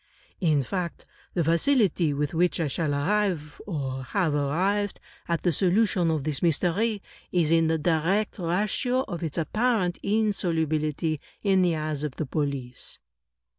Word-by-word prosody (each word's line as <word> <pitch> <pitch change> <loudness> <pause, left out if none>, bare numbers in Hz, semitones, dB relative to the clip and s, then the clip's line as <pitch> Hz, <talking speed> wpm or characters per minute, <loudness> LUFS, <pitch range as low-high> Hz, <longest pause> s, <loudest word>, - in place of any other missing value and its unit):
* - - -36
In 145 -2 +3
fact, 175 +4 -4 0.3
the 175 - +2
facility 170 - +3
with 145 +1 -1
which 175 +2 +2
I 160 - +1
shall 150 +2 -1
arrive, 170 -1 0
or 135 -7 -3
have 170 +2 0
arrived, 185 +8 0 0.3
at 170 -1 -1
the 175 - +3
solution 185 0 +2
of 155 -3 0
this 150 -1 -2
mystery, 190 +6 +1 0.3
is 170 -3 +2
in 165 -1 +4
the 160 0 +2
direct 175 +7 +1
ratio 210 +9 0
of 175 -9 -6
its 160 -4 -3
apparent 195 +2 +1
insolubility 160 -7 0 0.2
in 195 -2 +4
the 175 -2 +2
eyes 155 -1 -3
of 150 -4 -3
the 155 - -2
police." 140 -3 -3
170 Hz, 150 wpm, -26 LUFS, 150-195 Hz, 0.3 s, in